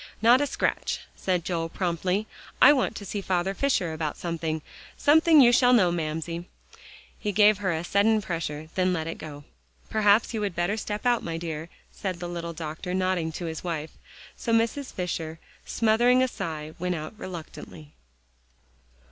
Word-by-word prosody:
"Not 240 +4 +6
a 290 - +1
scratch," - - -1
said 180 -3 -1
Joel 165 -2 -2
promptly. 180 +3 -1 0.3
"I 290 - +9
want 255 -5 0
to 205 - -7
see 200 +2 -4
Father 190 0 0
Fisher 195 -9 0
about 155 -2 -3
something. 160 -2 -3 0.3
Sometime 315 +1 +6
you 240 -2 +7
shall 250 +1 +5
know, 185 -8 +5
Mamsie." 165 +1 -3 0.7
He 210 - -2
gave 210 +1 +5
her 190 -3 0
hand 165 +1 -2
a - - -8
sudden 215 +2 +3
pressure, 165 -5 -4
then 185 0 +1
let 160 -2 -2
it 165 - -5
go. 145 -2 -9 0.5
"Perhaps 215 +1 +3
you 220 - -2
would 200 -4 -2
better 175 +4 0
step 210 +1 -4
out, 240 -1 +3
my 165 -1 -4
dear," 165 -1 -5 0.2
said 185 -3 -4
the 175 - -4
little 170 -1 -5
doctor, 160 +3 -5
nodding 185 -3 0
to 175 - -5
his 160 -1 -5
wife. 160 -3 -3 0.4
So 235 - -3
Mrs. 230 +4 +1
Fisher, 165 -3 -4 0.3
smothering 240 +3 +3
a - - +2
sigh, 155 -9 -5
went 180 0 -1
out 155 +2 -6
reluctantly. 160 -3 -9
180 Hz, 175 wpm, -26 LUFS, 165-215 Hz, 0.7 s, I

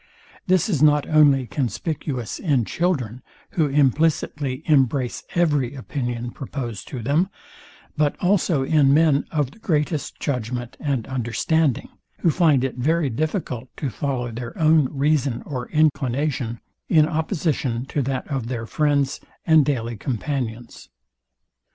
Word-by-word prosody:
This 185 -2 +3
is 165 -11 0
not 150 -1 +4
only 145 -4 +5
conspicuous 130 - -3
in 140 - +1
children, 130 - -1 0.3
who 160 -4 +1
implicitly 145 0 +1
embrace 135 -4 +2
every 145 -7 +1
opinion 120 -3 -4
proposed 120 -7 -6
to 125 -4 -6
them; 155 - +2 0.7
but 150 -2 +1
also 180 -6 +2
in 140 -1 +4
men 155 -3 +3
of 145 -5 -1
the 220 - -19
greatest 155 - -1
judgment 125 -2 -3
and 135 -6 -1
understanding, 130 +3 0 0.3
who 170 - +4
find 150 -6 +3
it 130 -2 -2
very 150 +2 +1
difficult 130 - -3
to 140 -4 -3
follow 125 -4 -2
their 115 +1 -7
own 155 -3 +4
reason 140 -3 0
or 125 -4 -5
inclination, 140 -5 0 0.3
in 155 -2 +5
opposition 155 - -1
to 145 - -2
that 135 0 -2
of 135 -6 -3
their 120 -2 -3
friends 145 +1 +1 0.3
and 160 -2 +6
daily 120 -5 -2
companions. 120 -1 -4
140 Hz, 130 wpm, -23 LUFS, 125-155 Hz, 0.7 s, and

